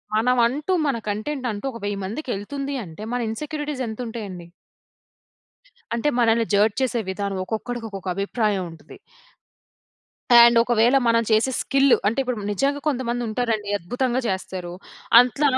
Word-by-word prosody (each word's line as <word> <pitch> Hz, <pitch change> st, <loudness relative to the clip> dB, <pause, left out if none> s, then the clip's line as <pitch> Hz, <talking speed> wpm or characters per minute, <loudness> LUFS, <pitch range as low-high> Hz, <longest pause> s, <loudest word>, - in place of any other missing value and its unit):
మనమంటూ 250 Hz, -, +2 dB, 0.2 s
మన 265 Hz, -4 st, 0 dB
కంటెంటంటూ 230 Hz, +1 st, -3 dB
ఒక 230 Hz, -, -9 dB
1000 205 Hz, -1 st, -2 dB
మందికెళ్తుంది 275 Hz, +4 st, -4 dB
అంటే 165 Hz, +5 st, -10 dB
మన 245 Hz, -, 0 dB
ఇన్‌సెక్యూరిటీస్ 295 Hz, +2 st, -4 dB
ఎంతుంటాయండి? 220 Hz, -6 st, -6 dB, 1.5 s
అంటే 235 Hz, +5 st, 0 dB
మనల్ని 230 Hz, -1 st, +3 dB
జడ్జ్ 205 Hz, +1 st, +3 dB
చేసే 245 Hz, -2 st, 0 dB
విధానం. 200 Hz, 0 st, -3 dB
ఒక్కొక్క‌డికొక్కొక్క 220 Hz, -2 st, -5 dB
అభిప్రాయం 200 Hz, -1 st, 0 dB
ఉంటది. 165 Hz, -, -14 dB, 1.4 s
అండ్ 235 Hz, 0 st, +8 dB
ఒకవేళ 240 Hz, +2 st, +3 dB
మనం 230 Hz, 0 st, +4 dB
చేసే 220 Hz, +4 st, +3 dB
స్కిల్లు. 275 Hz, -1 st, +4 dB
అంటే 220 Hz, +6 st, +1 dB
ఇప్పుడు 250 Hz, -3 st, -3 dB
నిజంగా 280 Hz, +7 st, 0 dB
కొంతమందుంటారండి. 240 Hz, -4 st, -1 dB
అద్భుతంగా 245 Hz, +8 st, -1 dB
చేస్తారు. 185 Hz, -2 st, -4 dB, 0.5 s
అట్ల‌ 250 Hz, +4 st, +1 dB
230 Hz, 115 wpm, -23 LUFS, 205-255 Hz, 1.5 s, అండ్